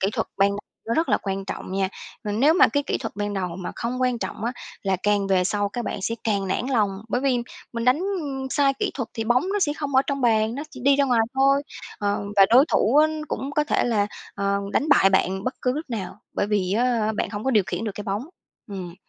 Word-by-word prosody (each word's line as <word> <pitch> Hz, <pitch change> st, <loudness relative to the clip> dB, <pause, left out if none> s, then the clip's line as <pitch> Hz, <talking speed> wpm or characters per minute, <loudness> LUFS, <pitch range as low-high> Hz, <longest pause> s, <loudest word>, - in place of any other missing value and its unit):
kỹ 195 Hz, -, +2 dB
thuật -, -, -1 dB
ban 195 Hz, +1 st, +4 dB, 0.4 s
nó 230 Hz, -, 0 dB
rất 325 Hz, +1 st, +1 dB
là -, -, +4 dB
quan 195 Hz, 0 st, -3 dB
trọng 190 Hz, -, -6 dB
nha. 190 Hz, 0 st, +1 dB, 0.4 s
Mà 210 Hz, -, -2 dB
nếu 275 Hz, +10 st, +4 dB
mà 400 Hz, +4 st, +6 dB
cái 285 Hz, -, 0 dB
kỹ -, -, -2 dB
thuật 225 Hz, -5 st, -6 dB
ban 205 Hz, 0 st, -2 dB
đầu 180 Hz, -3 st, -3 dB
mà 185 Hz, -, -5 dB
không 245 Hz, +2 st, -3 dB
quan 250 Hz, -2 st, +1 dB
trọng 220 Hz, -, -5 dB
á 240 Hz, -, 0 dB, 0.3 s
là 195 Hz, -2 st, +1 dB
càng 205 Hz, -1 st, +2 dB
về 185 Hz, -2 st, +2 dB
sau 205 Hz, +1 st, 0 dB
các 240 Hz, +3 st, -4 dB
bạn -, -, -3 dB
sẽ 230 Hz, -, -1 dB
càng 200 Hz, -3 st, 0 dB
nản 235 Hz, -, -1 dB
lòng, 220 Hz, -7 st, +2 dB, 0.2 s
bởi 245 Hz, -, 0 dB
vì 265 Hz, -3 st, +2 dB, 0.3 s
mình 230 Hz, -1 st, -3 dB
đánh 260 Hz, +8 st, +3 dB, 0.5 s
sai 280 Hz, -1 st, +3 dB
kỹ -, -, 0 dB
thuật 250 Hz, -4 st, -3 dB
thì 225 Hz, -, -2 dB
bóng 240 Hz, +2 st, +3 dB
nó 415 Hz, -, +1 dB
sẽ 295 Hz, -6 st, +2 dB
không 285 Hz, -2 st, -4 dB
ở 265 Hz, -, +6 dB
trong 275 Hz, -1 st, -2 dB
bàn, 225 Hz, -2 st, +2 dB
nó 280 Hz, -, -4 dB
chỉ 255 Hz, -, -10 dB
đi 280 Hz, 0 st, +5 dB
ra 280 Hz, -, +3 dB
ngoài 245 Hz, -4 st, +3 dB
thôi. 275 Hz, +1 st, +4 dB, 0.4 s
Ờ, 205 Hz, 0 st, -1 dB
và 195 Hz, -1 st, +8 dB
đối 255 Hz, +5 st, +7 dB
thủ 240 Hz, +7 st, +3 dB
á 305 Hz, +1 st, +7 dB, 0.2 s
cũng 270 Hz, -, -3 dB
có 300 Hz, 0 st, +2 dB
thể -, -, +1 dB
là, 215 Hz, -4 st, +2 dB, 0.3 s
ờ, 200 Hz, 0 st, 0 dB
đánh 295 Hz, -, +1 dB
bại 195 Hz, -9 st, +6 dB
bạn 190 Hz, 0 st, +1 dB
bất 255 Hz, -, -1 dB
cứ 250 Hz, -, +2 dB
lúc 305 Hz, +5 st, -4 dB
nào, 200 Hz, -3 st, -5 dB
bởi 200 Hz, -, 0 dB
vì, 195 Hz, -3 st, 0 dB
á, 225 Hz, -1 st, +1 dB
bạn -, -, -1 dB
hông 205 Hz, 0 st, -5 dB
có 265 Hz, -, +2 dB
điều 210 Hz, -6 st, +3 dB
khiển 225 Hz, -, -3 dB
được 210 Hz, -, -2 dB
cái 205 Hz, -, -6 dB
bóng, 200 Hz, +3 st, -2 dB, 0.4 s
ừm. 185 Hz, -5 st, -7 dB
225 Hz, 260 wpm, -24 LUFS, 200-265 Hz, 0.5 s, và